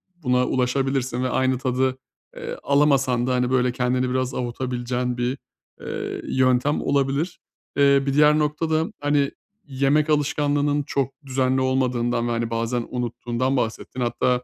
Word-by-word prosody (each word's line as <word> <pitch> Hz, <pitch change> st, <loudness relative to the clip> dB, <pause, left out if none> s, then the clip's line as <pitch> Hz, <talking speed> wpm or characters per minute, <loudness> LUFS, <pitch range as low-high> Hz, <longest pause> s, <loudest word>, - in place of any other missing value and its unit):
buna 125 Hz, -6 st, +1 dB
ulaşabilirsin 130 Hz, 0 st, 0 dB
ve 130 Hz, -, 0 dB
aynı 130 Hz, 0 st, +1 dB
tadı, 130 Hz, 0 st, 0 dB, 0.4 s
eee, 485 Hz, 0 st, -6 dB
alamasan 135 Hz, -4 st, +2 dB
da, 130 Hz, -, +1 dB
hani, 125 Hz, 0 st, +1 dB
böyle, 125 Hz, -1 st, +2 dB
kendini 125 Hz, +1 st, 0 dB
biraz 130 Hz, 0 st, -1 dB
avutabileceğin 125 Hz, 0 st, -2 dB
bir, 125 Hz, +3 st, -1 dB, 0.4 s
eee, -, -, -5 dB
yöntem 130 Hz, +2 st, +2 dB
olabilir. 140 Hz, +4 st, 0 dB, 0.4 s
Eee, 140 Hz, -1 st, +5 dB
bir 140 Hz, -, 0 dB
diğer 150 Hz, +1 st, +5 dB
nokta 150 Hz, +2 st, -1 dB
da, 160 Hz, +1 st, +1 dB
hani, 145 Hz, -1 st, +1 dB, 0.3 s
yemek 145 Hz, +2 st, +1 dB
alışkanlığının 145 Hz, 0 st, +1 dB
çok 135 Hz, -1 st, -1 dB
düzenli 130 Hz, 0 st, +1 dB
olmadığından 125 Hz, -2 st, 0 dB
ve, 120 Hz, -, -1 dB
hani, 115 Hz, 0 st, -1 dB
bazen 115 Hz, +1 st, -1 dB
unuttuğundan 125 Hz, +2 st, -2 dB
bahsettin. 125 Hz, +2 st, -3 dB
Hatta, 125 Hz, +1 st, +1 dB
130 Hz, 140 wpm, -23 LUFS, 125-140 Hz, 0.4 s, Eee